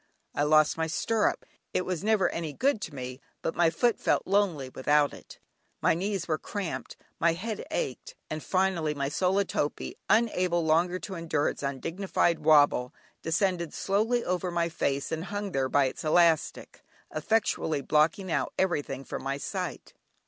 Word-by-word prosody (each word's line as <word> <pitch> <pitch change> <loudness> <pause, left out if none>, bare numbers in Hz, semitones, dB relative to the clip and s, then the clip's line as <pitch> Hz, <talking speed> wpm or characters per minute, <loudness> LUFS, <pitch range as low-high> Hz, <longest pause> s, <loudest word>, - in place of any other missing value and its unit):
I - - -1
lost 155 +1 +4
my 160 - +1
stirrup; 215 +7 0 0.3
it 180 - +1
was 185 -1 -3
never 215 -2 +3
any 160 -3 -4
good 260 - +1
to 160 - -6
me, 130 0 -6 0.2
but - - -1
my 170 -1 +3
foot 225 +9 +1
felt - - +1
lonely 185 -8 +1
without 145 +3 +2
it. - - -12 0.4
My - - +3
knees 190 +1 -2
were 155 -2 0
cramped, 200 -5 -5 0.2
my 170 0 +3
head 215 +6 -4
ached, - - -4
and 155 0 -4
finally 185 -5 0
my 140 -1 -1
sola 190 +6 +1
topee, 145 -4 -2
unable 185 -7 +2
longer 170 +3 +2
to 195 +1 -7
endure 165 -4 0
its - - -7
undignified 165 +5 0
wobble, 145 -5 +4 0.3
descended 170 0 0
slowly 220 +5 +1
over 180 0 -1
my 170 -1 0
face 140 -4 -1
and 160 +1 -2
hung 205 +1 -4
there 135 -4 0
by 140 0 +4
its 130 - -4
elastic, 165 0 +2 0.3
effectually 160 -4 0
blocking 165 +6 +2
out - - 0
everything 160 -7 -1
from - - -6
my 135 +1 -2
sight. - - -5
170 Hz, 165 wpm, -28 LUFS, 150-190 Hz, 0.4 s, lost